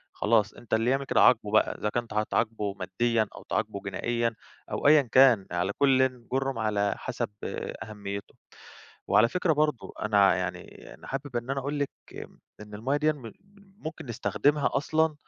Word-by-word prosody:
خلاص 105 -1 +2
أنت 115 -3 -9
اللي 115 +2 +2
يعمل 135 +1 0
كده - - +2
عاقبه 110 -4 +4
بقى، 110 - +3
إذا 105 - -1
كنت 120 +1 -3
هتعاقبه 105 -1 -1
ماديًا، 110 +3 0
أو - - -11
تعاقبه - - -2
جنائيًا، 115 -1 -1 0.4
أو - - 0
أيًا 150 0 +7
كان 125 -5 +5
على 90 +3 0
كل 130 -3 +2
جُرم 135 -2 -1
على 105 -2 +1
حسب - - -4 0.5
أهميته. 100 -2 -7 0.7
وعلى 115 - +5
فكرة 175 +5 +1
برضه، 150 -4 0
أنا 100 -3 +4
يعني 90 0 -6
أنا - - -14
حابب 135 -2 -5
إن 120 +2 -3
أنا 135 0 -1
أقول 145 +2 -3
لِك 140 - +1 0.3
امم - - -10 0.2
إن 105 0 -10
المَيّة 130 +7 -1
ديًّا 155 +1 +2
م 120 -7 -10 0.5
ممكن 155 -5 -7
نستخدمها 140 +5 +1
أصلًا 155 +2 +1
120 Hz, 165 wpm, -27 LUFS, 105-135 Hz, 0.7 s, أيًا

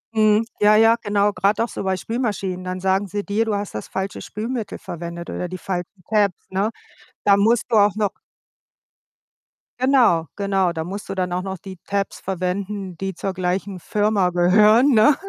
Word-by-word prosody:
Mhm, 215 +1 +4
ja, 210 +1 +6
ja, 225 +1 +6
genau. 205 -1 +2
Grad 195 +2 +1
auch 230 - +2
so - - -5
bei 190 -1 0
Spülmaschinen, 200 -5 -3
dann 185 0 -4
sagen 190 +2 +1
sie 205 +2 -3
dir: 215 +2 0
„Du 215 - 0
hast 205 0 -4
das 105 - -5
falsche 190 +1 -4
Spülmittel 225 +1 -4
verwendet 170 0 -7
oder 180 - -3
die 185 +1 -6
falschen 180 0 -5
Tabs“, 205 -4 +3
ne? 195 +3 0 0.6
Da 200 -1 +6
musst 220 +3 +2
du 225 - +3
auch 205 -1 +5
noch 210 -2 0 1.7
genau, 245 -11 +4
genau, 195 -3 +1
da 160 -1 -3
musst 195 +4 -7
du 195 - -3
dann 180 -1 -1
auch 180 - -1
noch 190 0 -5
die 190 +1 -10
Tabs 200 0 -2
verwenden, 190 0 -3
die 195 +2 -3
zur 195 +1 -3
gleichen 185 +1 -2
Firma 205 0 +1
gehören, 210 +9 +5
ne? 225 +6 +6
200 Hz, 180 wpm, -22 LUFS, 185-210 Hz, 1.7 s, ja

